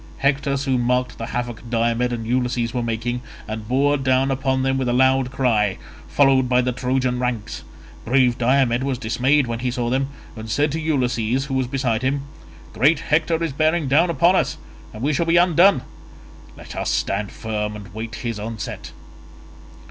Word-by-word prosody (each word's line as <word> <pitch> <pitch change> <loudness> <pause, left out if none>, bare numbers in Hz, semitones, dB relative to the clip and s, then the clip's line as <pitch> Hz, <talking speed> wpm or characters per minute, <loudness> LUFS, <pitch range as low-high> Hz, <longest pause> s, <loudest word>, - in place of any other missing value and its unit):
Hector 140 0 +1
soon 135 -2 0
marked 125 +1 0
the 115 - -4
havoc 120 -2 -4
Diomed 120 +1 +1
and 115 -2 -4
Ulysses 120 -1 -1
were 125 - -1
making, 115 +1 -2 0.3
and 110 0 -6
bore 140 +4 +2
down 135 0 +1
upon 130 0 0
them 135 0 +1
with 130 -2 -1
a - - +1
loud 130 0 +3
cry, 115 -7 +1 0.3
followed 135 -3 +3
by 125 0 +3
the 125 0 +1
Trojan 125 0 -1
ranks; 120 -4 -3 0.4
brave 125 0 +3
Diomed 125 0 +2
was 135 -1 -1
dismayed 130 +5 +2
when 115 -1 -4
he 125 +1 -1
saw 120 -1 -2
them, 135 +1 +1 0.3
and 110 0 -8
said 145 +8 +1
to 160 - -2
Ulysses 130 -4 0
who 135 - -5
was 130 -1 0
beside 125 -4 -1
him, 135 +2 -1 0.5
"Great 145 +7 +3
Hector 160 +2 +1
is 165 -4 -2
bearing 155 +1 +1
down 155 +6 +3
upon 170 +2 +3
us - - 0 0.3
and 110 - -8
we 150 +2 +1
shall 165 +3 0
be 165 +1 +4
undone; 175 -3 +5 0.7
let - - -10
us - - -2
stand 100 0 -1
firm 105 -1 -4
and 100 -3 -10
wait 110 +1 -6
his 115 -3 -3
onset." 110 +1 -6
125 Hz, 180 wpm, -21 LUFS, 120-135 Hz, 0.7 s, undone